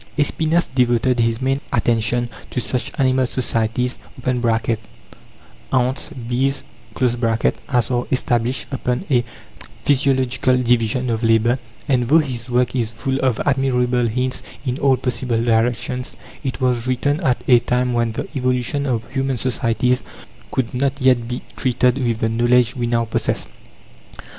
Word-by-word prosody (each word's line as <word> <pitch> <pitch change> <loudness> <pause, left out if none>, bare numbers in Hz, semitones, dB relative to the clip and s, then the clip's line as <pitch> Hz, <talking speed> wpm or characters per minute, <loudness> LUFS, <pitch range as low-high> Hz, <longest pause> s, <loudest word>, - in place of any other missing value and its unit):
Espinas 160 +3 +2
devoted 125 0 +2
his 115 +1 +1
main 135 +1 +1
attention 120 +1 +1 0.2
to - - -2
such 125 0 -2
animal 130 -1 +3
societies 120 0 -1 1.7
(ants, 130 +1 0
bees) 130 -1 -1 0.4
as 120 0 +1
are 120 0 0
established 125 -1 0
upon 125 +3 -2
a 120 -2 +4 0.6
physiological 130 -2 +2
division 120 0 +1
of 110 0 -1
labour, 115 +2 +3 0.3
and 125 -4 +1
though 155 - +7
his 130 -6 -2
work 125 +1 +1
is 115 -4 0
full 130 +4 -2
of 130 -4 +1
admirable 125 -3 +2
hints 125 +3 -2 0.2
in 125 0 -2
all 135 -2 +3
possible 125 -2 -1
directions, 120 +2 0 0.3
it 135 -1 -3
was 125 -2 0
written 140 +4 +1
at 130 -7 +1
a 125 -2 +7
time 125 +1 0
when 120 -1 +1
the - - -4
evolution 130 +2 0
of 120 -3 -1
human 135 -1 -1
societies 125 +1 0 0.5
could 130 -3 -1
not 135 +2 0
yet 125 -3 +3
be 125 +1 -4
treated 125 0 +1
with 115 -2 -1
the 110 - +2
knowledge 120 +2 +3
we 120 -2 -1
now 115 0 +1
possess. 115 - -1
125 Hz, 140 wpm, -20 LUFS, 120-130 Hz, 1.7 s, though